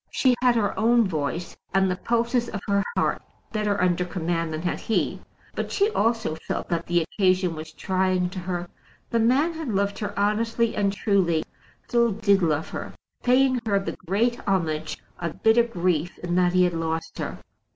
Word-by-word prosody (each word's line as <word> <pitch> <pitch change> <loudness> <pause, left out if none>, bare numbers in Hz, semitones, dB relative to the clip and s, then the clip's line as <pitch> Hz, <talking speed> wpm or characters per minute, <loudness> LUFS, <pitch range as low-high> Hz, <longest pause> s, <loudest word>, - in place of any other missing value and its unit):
She 260 -2 +3
had 250 -1 +4
her 210 -3 +1
own 230 0 +4
voice, 165 +1 -3 0.2
and 190 -1 +3
the - - 0
pulses 235 +3 0
of 205 - -4
her 200 -1 +2
heart - - +1 0.3
better 210 -2 0
under 180 0 +2
command 165 -2 -2
than 155 +1 -4
had 180 - -1
he; 225 - -1 0.3
but - - -3
she 410 +2 +2
also 225 - +1
felt - - -3
that 170 -1 -1
the 175 -1 +2
occasion 185 0 +1
was 160 0 -8
trying 185 +1 0
to 185 - -5
her. 175 -1 -3 0.4
The 230 - +2
man 265 +9 +3
had 320 -2 -5
loved 200 -1 0
her 205 -1 -4
honestly 225 +3 +1
and 200 -1 +2
truly, 195 -6 +1 0.4
still 235 -2 +3
did 200 -1 +3
love 160 -2 0
her, - - -6 0.3
paying 255 0 +3
her 200 -2 +3
the 195 - -4
great 230 +6 +1
homage 160 -5 0 0.2
of 170 -2 -5
bitter 225 +2 +6
grief 180 -7 -1
in 175 0 -4
that 180 0 +3
he 185 0 +5
had 180 -1 +2
lost 165 0 -3
her. - - -4
195 Hz, 180 wpm, -25 LUFS, 175-230 Hz, 0.4 s, bitter